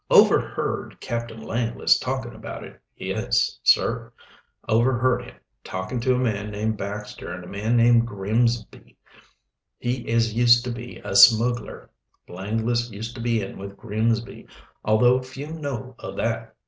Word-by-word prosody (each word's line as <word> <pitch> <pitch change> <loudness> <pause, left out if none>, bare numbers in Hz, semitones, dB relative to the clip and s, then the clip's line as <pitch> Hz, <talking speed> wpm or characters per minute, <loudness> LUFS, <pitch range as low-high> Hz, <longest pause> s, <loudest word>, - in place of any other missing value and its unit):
"Overheard - - +3
Captain 115 -1 -4
Langless 115 +1 +1
talking 130 -2 -3
about - - -8
it, - - -13 0.2
yes, - - 0
sir 115 0 +2 0.6
overheard 120 +2 +2
him - - -13 0.3
talking 95 +6 -4
to 125 +2 +2
a - - 0
man 105 -4 -1
named 110 +1 -2
Baxter 100 -2 -6
and 90 0 -7
a - - -11
man 110 +5 0
named 115 0 +5
Grimsby 115 +3 -1 0.8
he 120 -1 -3
as 115 -1 +2
used 120 +1 +5
to 125 - -2
be 120 +1 -8
a - - -3
smuggler. 115 +1 +5 0.4
Langless 115 +6 -1
used 110 +2 -6
to 120 - -8
be 115 -2 0
in 95 - -8
with 100 0 -8
Grimsby, 115 +2 -2 0.4
although 120 +4 +4
few 135 +4 -8
know 135 -5 -5
o' - - -6
that. - - -2
115 Hz, 145 wpm, -24 LUFS, 110-120 Hz, 0.8 s, named